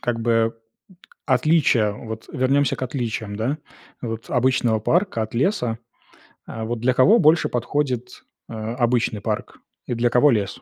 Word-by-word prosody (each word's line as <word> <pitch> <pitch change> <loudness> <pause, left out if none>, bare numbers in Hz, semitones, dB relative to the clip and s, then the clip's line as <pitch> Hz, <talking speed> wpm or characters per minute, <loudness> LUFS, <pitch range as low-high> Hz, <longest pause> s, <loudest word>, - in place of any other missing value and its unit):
как 115 -1 -2
бы 115 0 +1 0.7
отличие, 130 -6 +3
вот 110 0 -8
вернемся 135 0 +1
к - - -9
отличиям, 115 -5 -3
да, 125 +7 -1 0.5
вот 115 -1 -5
обычного 125 -3 +2
парка 175 - +1
от 110 - -6
леса, 120 - 0 0.7
э, 110 - -6
вот, 115 +1 -3
для 125 +2 +2
кого 205 - +5
больше 160 +2 +4
подходит, 125 0 -2 0.3
э, - - -8
обычный 115 0 -1
парк, 110 -1 -4 0.3
и - - -2
для 120 +1 +1
кого 130 +4 +4
лес? 100 -4 -2
120 Hz, 145 wpm, -22 LUFS, 115-130 Hz, 0.7 s, кого